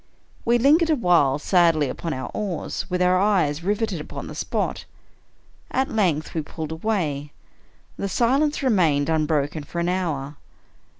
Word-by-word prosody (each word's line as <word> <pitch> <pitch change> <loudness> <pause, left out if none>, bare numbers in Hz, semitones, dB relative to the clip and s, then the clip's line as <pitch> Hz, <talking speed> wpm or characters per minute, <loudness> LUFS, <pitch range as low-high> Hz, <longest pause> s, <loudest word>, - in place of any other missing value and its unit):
We 235 +1 +4
lingered 305 +7 +4
awhile 175 - +3
sadly 165 -2 +3
upon 165 +5 -4
our 130 -3 -4
oars, 200 -2 -4
with 180 0 +1
our 180 0 +3
eyes 180 -7 +1
riveted 205 -3 -1
upon - - -7
the - - -8
spot. - - -3 0.8
At 265 +2 0
length 170 -8 0
we 160 - -1
pulled 155 +1 -7
away. 160 -6 -2 0.6
The 200 - -3
silence 275 +8 +1
remained 165 - +2
unbroken 155 -1 0
for 170 +4 -6
an 170 +1 0
hour. 150 -6 -2
175 Hz, 140 wpm, -23 LUFS, 150-210 Hz, 0.8 s, We